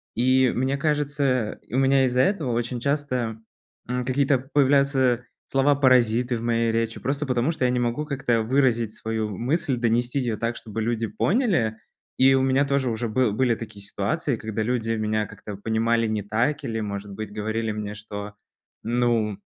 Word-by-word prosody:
И 130 Hz, +1 st, +3 dB
мне 130 Hz, +2 st, 0 dB
кажется, 140 Hz, -5 st, 0 dB
у 120 Hz, -, -2 dB
меня 135 Hz, 0 st, +4 dB
из-за 125 Hz, 0 st, +2 dB
этого 170 Hz, -10 st, +1 dB
очень 120 Hz, +1 st, -2 dB
часто, 125 Hz, -4 st, -1 dB, 0.5 s
м, 125 Hz, 0 st, -2 dB
какие-то 135 Hz, 0 st, +2 dB
появляются 135 Hz, -2 st, +2 dB, 0.2 s
слова-паразиты 130 Hz, -3 st, +3 dB
в -, -, -7 dB
моей 115 Hz, -1 st, +1 dB
речи, 115 Hz, 0 st, -1 dB
просто 140 Hz, +2 st, -2 dB
потому 125 Hz, +3 st, +1 dB
что 155 Hz, -, -3 dB
я 125 Hz, -, +2 dB
не 125 Hz, -, 0 dB
могу, 120 Hz, +5 st, -1 dB
как-то, 135 Hz, -6 st, 0 dB
выразить 120 Hz, -2 st, +1 dB
свою 110 Hz, -1 st, -3 dB
мысль, 135 Hz, +1 st, 0 dB
донести 120 Hz, +3 st, +1 dB
её 120 Hz, -4 st, -1 dB
так, 115 Hz, +2 st, -2 dB
чтобы 110 Hz, 0 st, -5 dB
люди 115 Hz, 0 st, -1 dB
поняли. 170 Hz, -, +1 dB, 0.4 s
И 135 Hz, +1 st, +6 dB
у 135 Hz, -, +3 dB
меня 135 Hz, +1 st, +3 dB
тоже 140 Hz, -2 st, 0 dB
уже 115 Hz, +1 st, -2 dB
был 115 Hz, +1 st, +1 dB
были 120 Hz, +3 st, +2 dB
такие 105 Hz, -3 st, -9 dB
ситуации, 115 Hz, +7 st, -1 dB
когда 110 Hz, 0 st, -3 dB
люди 115 Hz, -1 st, -1 dB
меня 110 Hz, -1 st, -1 dB
как-то 105 Hz, +1 st, -9 dB
понимали 115 Hz, +2 st, +1 dB
не 110 Hz, -1 st, -2 dB
так, 120 Hz, +8 st, 0 dB
или, 115 Hz, -4 st, -3 dB
может 100 Hz, -1 st, -5 dB
быть, 110 Hz, 0 st, -6 dB
говорили 110 Hz, +1 st, -2 dB
мне, 105 Hz, 0 st, -4 dB
что, 105 Hz, 0 st, -7 dB, 0.5 s
ну, 115 Hz, -3 st, +1 dB
120 Hz, 170 wpm, -24 LUFS, 110-135 Hz, 0.5 s, И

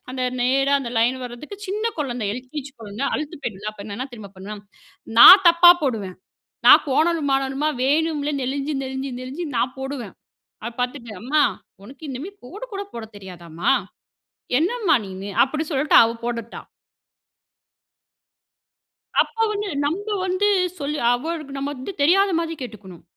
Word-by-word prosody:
அந்த 255 Hz, 0 st, -5 dB, 0.2 s
நேரா 270 Hz, +3 st, +2 dB
அந்த 245 Hz, -3 st, -5 dB
லைன் 240 Hz, +3 st, +2 dB
வரதுக்கு. 250 Hz, +11 st, -9 dB
சின்ன 415 Hz, +3 st, -3 dB
குழந்தை 245 Hz, -7 st, -2 dB
எல்-கே-ஜி 260 Hz, +4 st, -7 dB
குழந்தை 215 Hz, +4 st, -5 dB
அழுத்து 305 Hz, +2 st, -5 dB
போயிடும்ல 210 Hz, -3 st, -4 dB
அப்ப 200 Hz, -1 st, -11 dB
என்ன 225 Hz, +6 st, -5 dB
தெரியுமா 215 Hz, -4 st, -10 dB
பண்ணுவேன்? 205 Hz, +2 st, -8 dB, 0.6 s
நான் 380 Hz, +9 st, +11 dB
தப்பா 340 Hz, +1 st, +8 dB
போடுவேன், 215 Hz, -9 st, -2 dB, 0.5 s
நான் -, -, +9 dB
கோணலுமானலுமா 285 Hz, -2 st, +1 dB
வேணும்ல 300 Hz, +1 st, +1 dB
நெளிஞ்சு, 275 Hz, +3 st, -2 dB
நெளிஞ்சு, 265 Hz, +1 st, -5 dB
நெளிஞ்சி 275 Hz, +7 st, -6 dB
நான் 250 Hz, +2 st, -1 dB
போடுவேன். 265 Hz, -6 st, -6 dB, 0.5 s
அத 235 Hz, -, -3 dB
பார்த்துட்டு 245 Hz, -1 st, -3 dB
அம்மா 295 Hz, +6 st, +1 dB, 0.4 s
உனக்கு 260 Hz, +9 st, -14 dB
இனுமே 270 Hz, +9 st, -6 dB
கோடு 390 Hz, -, -8 dB
கூட 395 Hz, 0 st, -4 dB
போடத் 220 Hz, -2 st, -9 dB
தெரியாதாம்மா? 175 Hz, -4 st, -3 dB, 0.9 s
என்னம்மா 380 Hz, +1 st, +1 dB
நீன்னு? 190 Hz, +1 st, -7 dB
அப்படி 305 Hz, +4 st, -2 dB
சொல்லிட்டு 290 Hz, +1 st, +2 dB
அவ 225 Hz, -, +1 dB
போடட்டா. 235 Hz, -1 st, -4 dB, 2.6 s
அப்ப -, -, -13 dB, 0.2 s
வந்து 415 Hz, 0 st, -3 dB, 0.2 s
நம்ம 350 Hz, +9 st, -2 dB, 0.2 s
வந்து 370 Hz, +3 st, +1 dB, 0.3 s
சொல் 295 Hz, +1 st, -3 dB, 0.2 s
அவளுக்கு 300 Hz, +2 st, -4 dB
நம்ம 280 Hz, +1 st, -3 dB
வந்து 260 Hz, +8 st, -7 dB
தெரியாத 390 Hz, +6 st, +4 dB
மாதிரி 330 Hz, -1 st, -3 dB
கேட்டுக்கணும். 200 Hz, -7 st, -10 dB
270 Hz, 135 wpm, -22 LUFS, 235-310 Hz, 2.6 s, நான்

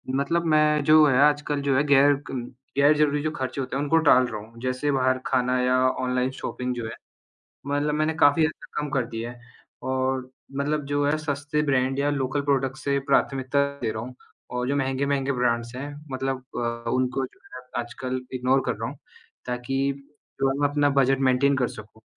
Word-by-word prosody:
मतलब 165 Hz, +5 st, 0 dB
मैं 150 Hz, -1 st, +3 dB
जो 155 Hz, +1 st, +7 dB
है 130 Hz, -4 st, +3 dB
आजकल 145 Hz, 0 st, +2 dB
जो 140 Hz, -1 st, +1 dB
है 140 Hz, -, +3 dB
गैर 145 Hz, 0 st, +6 dB, 0.2 s
क 125 Hz, -2 st, -5 dB, 0.2 s
गैर-ज़रूरी 145 Hz, 0 st, +4 dB
जो 155 Hz, -, 0 dB
खर्चे 130 Hz, +1 st, -4 dB
होते 130 Hz, 0 st, -4 dB
हैं 140 Hz, -, 0 dB
उनको 150 Hz, +3 st, +3 dB
टाल 130 Hz, -1 st, +6 dB
रहा 110 Hz, -2 st, -5 dB
हूँ। 115 Hz, +2 st, -14 dB
जैसे 130 Hz, +3 st, -1 dB
बाहर 130 Hz, -1 st, +2 dB
खाना 130 Hz, -3 st, +1 dB
या 125 Hz, 0 st, +2 dB, 0.2 s
ऑनलाइन 125 Hz, 0 st, 0 dB
शॉपिंग 125 Hz, -1 st, -4 dB
जो 120 Hz, -2 st, -4 dB
है, 110 Hz, -, -5 dB, 0.8 s
मतलब 145 Hz, +1 st, 0 dB
मैंने 155 Hz, +1 st, 0 dB
काफ़ी 155 Hz, +1 st, +4 dB
हद 155 Hz, -, +2 dB
तक -, -, -9 dB
कम 150 Hz, -, -3 dB
कर 135 Hz, -2 st, +1 dB
दिया 115 Hz, 0 st, -5 dB
है 120 Hz, -, -13 dB, 0.4 s
और 130 Hz, 0 st, -1 dB, 0.3 s
मतलब 145 Hz, +1 st, -1 dB
जो 145 Hz, 0 st, 0 dB
है 150 Hz, +2 st, +2 dB
सस्ते 150 Hz, 0 st, -2 dB
ब्रैंड 130 Hz, 0 st, +1 dB
या 145 Hz, +1 st, +2 dB
लोकल 135 Hz, 0 st, -1 dB
प्रोडक्ट 135 Hz, -2 st, 0 dB
से 140 Hz, 0 st, 0 dB
प्राथमिकता 135 Hz, +1 st, +2 dB, 0.2 s
दे 115 Hz, -, 0 dB
रहा 110 Hz, 0 st, -5 dB
हूँ 125 Hz, +1 st, -8 dB, 0.4 s
और 125 Hz, 0 st, -2 dB
जो 140 Hz, -, +1 dB
महँगे-महँगे 135 Hz, 0 st, 0 dB
ब्रैंड्स 120 Hz, -1 st, 0 dB
है 140 Hz, +3 st, -5 dB, 0.2 s
मतलब 130 Hz, 0 st, -3 dB
अ, 115 Hz, -1 st, -3 dB
उनको 130 Hz, +1 st, 0 dB
जो 130 Hz, -, -11 dB
है 125 Hz, -, -8 dB, 0.2 s
आजकल 130 Hz, +2 st, -5 dB
इग्नोर 130 Hz, +1 st, +2 dB
कर -, -, +1 dB
रहा -, -, -4 dB
हूँ -, -, -11 dB, 0.5 s
ताकि 135 Hz, +3 st, -1 dB, 0.5 s
जो 135 Hz, -, +3 dB
है 135 Hz, -, -2 dB
मैं 145 Hz, -, +3 dB
अपना 145 Hz, 0 st, +2 dB
बजट 135 Hz, 0 st, +3 dB
मेंटेन 140 Hz, +2 st, +3 dB
कर 125 Hz, -2 st, +1 dB
सकूँ 110 Hz, +1 st, -12 dB
135 Hz, 200 wpm, -25 LUFS, 125-145 Hz, 0.8 s, जो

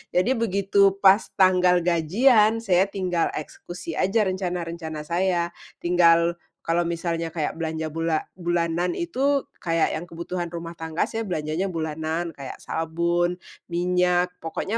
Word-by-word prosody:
Jadi 185 Hz, +8 st, +3 dB
begitu 200 Hz, -4 st, +2 dB
pas 195 Hz, +3 st, +6 dB
tanggal 180 Hz, -2 st, +4 dB
gajian, 215 Hz, -, +3 dB
saya 190 Hz, 0 st, +3 dB
tinggal 185 Hz, -4 st, -1 dB
eksekusi 165 Hz, +2 st, -7 dB
aja 210 Hz, +3 st, +2 dB
rencana-rencana 170 Hz, -4 st, -3 dB
saya, 170 Hz, +1 st, 0 dB, 0.3 s
tinggal 170 Hz, -1 st, +4 dB, 0.2 s
kalau 170 Hz, +1 st, +1 dB
misalnya 165 Hz, -1 st, -2 dB
kayak 160 Hz, -1 st, -2 dB
belanja 160 Hz, -1 st, -3 dB
bula 165 Hz, 0 st, -1 dB, 0.2 s
bulanan 175 Hz, 0 st, 0 dB
itu 280 Hz, -4 st, 0 dB, 0.2 s
kayak 165 Hz, -1 st, +1 dB
yang 165 Hz, +3 st, -5 dB
kebutuhan 175 Hz, +1 st, -5 dB
rumah 170 Hz, 0 st, -5 dB
tangga, 160 Hz, 0 st, -2 dB
saya 225 Hz, 0 st, -3 dB
belanjanya 155 Hz, +2 st, -2 dB
bulanan, 160 Hz, 0 st, -3 dB
kayak 140 Hz, -3 st, -9 dB
sabun, 170 Hz, +2 st, 0 dB, 0.3 s
minyak, 180 Hz, +1 st, +1 dB
pokoknya 195 Hz, +7 st, -3 dB
175 Hz, 125 wpm, -24 LUFS, 165-185 Hz, 0.3 s, pas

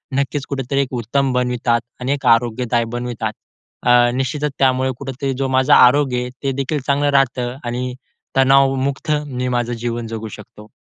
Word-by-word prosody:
नक्कीच 140 Hz, 0 st, -1 dB
कुठेतरी 135 Hz, 0 st, -1 dB
एक 135 Hz, -1 st, -4 dB
उत्तम 130 Hz, +3 st, 0 dB
बनवितात 125 Hz, -1 st, +1 dB, 0.2 s
आणि 130 Hz, +3 st, 0 dB
एक 145 Hz, -, -5 dB
आरोग्यदायी 120 Hz, 0 st, +2 dB
बनवितात. 120 Hz, -3 st, -3 dB, 0.5 s
अ, 120 Hz, 0 st, +5 dB
निश्चितच 135 Hz, +3 st, -1 dB
त्यामुळे 130 Hz, 0 st, +2 dB
कुठेतरी 135 Hz, 0 st, -3 dB
जो 135 Hz, 0 st, 0 dB
माझा 130 Hz, +2 st, +4 dB
आरोग्य 125 Hz, 0 st, +5 dB
आहे, 125 Hz, -, -4 dB
ते 135 Hz, -, 0 dB
देखील 140 Hz, +3 st, -2 dB
चांगलं 145 Hz, +1 st, +2 dB
राहतं 125 Hz, -3 st, +1 dB
आणि 125 Hz, +1 st, -3 dB, 0.4 s
तणावमुक्त 135 Hz, +1 st, +3 dB, 0.2 s
मी 125 Hz, -2 st, -3 dB
माझं 120 Hz, -1 st, -1 dB
जीवन 120 Hz, 0 st, -4 dB
जगू 110 Hz, 0 st, -5 dB
शकतो. 105 Hz, 0 st, -14 dB
125 Hz, 155 wpm, -19 LUFS, 120-135 Hz, 0.5 s, अ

